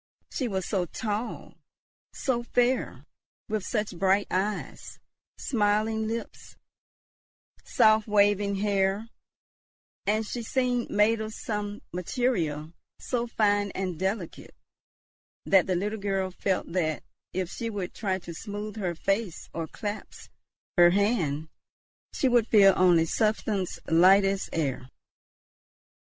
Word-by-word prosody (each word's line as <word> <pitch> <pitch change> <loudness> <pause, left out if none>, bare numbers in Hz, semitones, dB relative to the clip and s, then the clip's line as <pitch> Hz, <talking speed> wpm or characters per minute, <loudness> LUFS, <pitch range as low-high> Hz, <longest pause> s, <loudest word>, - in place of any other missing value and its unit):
She 260 - -1
was 190 -4 -2
so 185 -4 -1
tall, 215 +6 -4 0.6
so 250 -3 -1
fair, 245 +1 0 0.4
with 215 -2 -2
such 210 -4 -2
bright 195 +2 +3
eyes, 200 +3 -3 0.4
smiling 220 -1 +1
lips, 230 +1 -6 1.1
soft 215 0 +4
waving 205 -1 +3
hair; 200 +2 0 1.0
and 215 +2 +1
she 240 +3 -4
seemed 245 0 0
made 215 +2 +3
of 220 0 -5
some 210 -1 -4
material 175 - -1 0.2
so 240 -2 -2
fine 205 -3 +1
and 185 -4 -3
delicate, 190 -2 -4 0.9
that 190 -2 +4
the 185 - +1
little 210 +4 -2
girl 195 -2 -1
felt 185 -1 -2
that, 160 -4 -1 0.3
if 185 -1 -3
she 230 -1 -4
would 200 -5 -4
try 190 -3 -1
to 170 -2 -9
smooth 205 +4 -6
her 180 -5 -2
face 195 +2 -2
or 165 -1 -3
clasp 210 +3 -7 0.5
her 175 0 +9
hand, 175 -7 +1 0.6
she 270 - +1
would 240 -3 +3
feel 195 -3 +7
only 175 -3 +5
substance 210 -1 0
light 185 +4 +6
as 195 0 -1
air. 135 -5 -2
205 Hz, 120 wpm, -27 LUFS, 185-220 Hz, 1.1 s, her